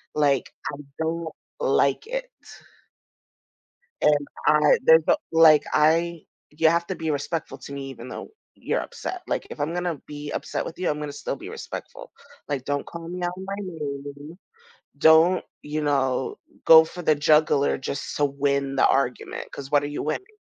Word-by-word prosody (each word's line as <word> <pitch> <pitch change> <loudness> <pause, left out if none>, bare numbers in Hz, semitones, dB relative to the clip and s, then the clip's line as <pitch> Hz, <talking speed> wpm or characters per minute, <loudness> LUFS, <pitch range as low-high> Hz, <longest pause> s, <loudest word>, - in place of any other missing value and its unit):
Like, 140 -3 +1 0.2
I - - -6 0.2
don't 160 0 -2 0.3
like 485 -2 +2
it. - - -4 1.7
And 145 -1 +3 0.2
I - - +5
there's 485 0 +7
a - - +4
like 155 -2 +7
I 165 +2 +3 0.3
you 160 +1 +3
have 170 +1 +1
to 190 - -3
be 160 -1 -2
respectful 145 -1 -3
to 140 - -9
me 135 -1 -6
even 120 -1 -9
though - - -7 0.3
you're - - 0
upset. 370 -1 -6
Like, - - -2
if - - -9
I'm 150 +4 -1
gonna 175 -4 -2
be 145 0 -7
upset - - -3
with - - -7
you, 185 - 0
I'm 150 0 -1
gonna 150 -1 -4
still - - -4
be - - -9
respectful. - - -8 0.4
Like, 135 -3 -3
"Don't 145 0 -2
call 170 -1 -8
me 180 +1 -6
out 175 - 0
on 190 - -7
my 195 0 -4
name. 145 -3 -7 0.6
Don't, 160 +4 +5 0.2
you 150 +1 -3
know, 135 -3 0 0.3
go 160 0 +9
for 175 +2 -8
the 155 - +4
jugular 150 -1 +3
just 135 +1 -5
to 145 - +2
win 140 -1 0
the - - +5
argument, 125 -2 -1
'cause 140 -1 -8
what 145 -1 +4
are - - -2
you 145 - -4
winning?" 385 - -4
150 Hz, 175 wpm, -24 LUFS, 140-170 Hz, 1.7 s, go